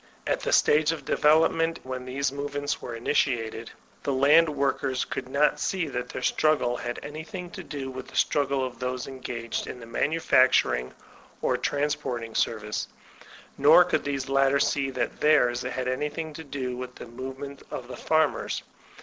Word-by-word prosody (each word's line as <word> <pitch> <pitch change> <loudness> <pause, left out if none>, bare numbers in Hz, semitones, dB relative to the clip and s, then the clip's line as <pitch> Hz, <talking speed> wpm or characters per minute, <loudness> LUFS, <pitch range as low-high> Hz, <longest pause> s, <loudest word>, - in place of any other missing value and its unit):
At - - 0
the - - -2
stage 150 +1 +4
of 155 -4 -6
development 165 +2 +3
when 130 -1 -5
these 135 +1 -1
movements 145 0 -3
were 120 - -6
initiated, 115 -2 0 0.3
the 140 - -1
land 145 +5 +5
workers 140 -2 0
could 125 - -5
not 150 +2 +2
see 180 -1 -1
that 125 -2 -4
their - - -6
struggle 135 -6 +2
had 120 0 -4
any 155 +2 -6
thing 180 0 -7
to 190 - -8
do 140 -4 -5
with 130 0 -7
the - - -13
struggle 140 -2 +1
of 125 -2 -7
those 125 0 -3
engaged 120 -3 -5
in 125 - -7
the 115 - -10
manufacturing 115 - +2 0.5
or - - +2
transporting 125 -6 -2
service; 105 -1 -1 0.7
nor 150 +5 +8
could 170 -3 0
these 140 -2 -2
latter 135 0 +3
see 140 -1 +1
that 125 -2 -3
theirs 125 -6 +4
had 125 0 -3
anything 150 +4 -2
to 160 - -8
do 135 -4 -4
with 125 0 -7
the - - -9
move 130 +3 -7
ment 140 0 -8
of 120 - -6
the 125 - -7
farmers. 155 +3 0
135 Hz, 170 wpm, -27 LUFS, 125-150 Hz, 0.7 s, nor